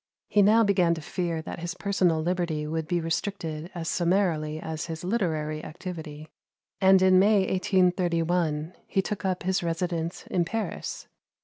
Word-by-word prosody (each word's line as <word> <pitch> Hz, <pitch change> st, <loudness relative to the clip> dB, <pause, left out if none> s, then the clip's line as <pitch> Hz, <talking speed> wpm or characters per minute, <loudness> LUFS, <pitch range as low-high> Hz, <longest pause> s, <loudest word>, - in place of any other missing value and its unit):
He 210 Hz, -, +4 dB
now 215 Hz, +3 st, +6 dB
began 180 Hz, -5 st, +3 dB
to -, -, -6 dB
fear 165 Hz, 0 st, -3 dB
that -, -, -6 dB
his 170 Hz, 0 st, -4 dB
personal 185 Hz, -5 st, +1 dB
liberty 170 Hz, -3 st, -1 dB
would 160 Hz, +1 st, -3 dB
be 175 Hz, +1 st, +1 dB
restricted 165 Hz, -1 st, -3 dB
as 165 Hz, -2 st, -4 dB
summarily 170 Hz, -4 st, +1 dB
as 160 Hz, -3 st, -5 dB
his 165 Hz, 0 st, -6 dB
literary 160 Hz, -7 st, -1 dB
activity; 155 Hz, -2 st, -7 dB, 0.5 s
and 190 Hz, 0 st, +7 dB
in 185 Hz, 0 st, +6 dB
May, 205 Hz, +1 st, +5 dB
1831, 175 Hz, -4 st, +1 dB
he 195 Hz, -, +1 dB
took 210 Hz, 0 st, -4 dB
up 185 Hz, -1 st, -1 dB
his 190 Hz, +1 st, +1 dB
residence 170 Hz, 0 st, -2 dB
in 180 Hz, -, 0 dB
Paris. 220 Hz, +6 st, -4 dB
175 Hz, 150 wpm, -27 LUFS, 160-190 Hz, 0.5 s, and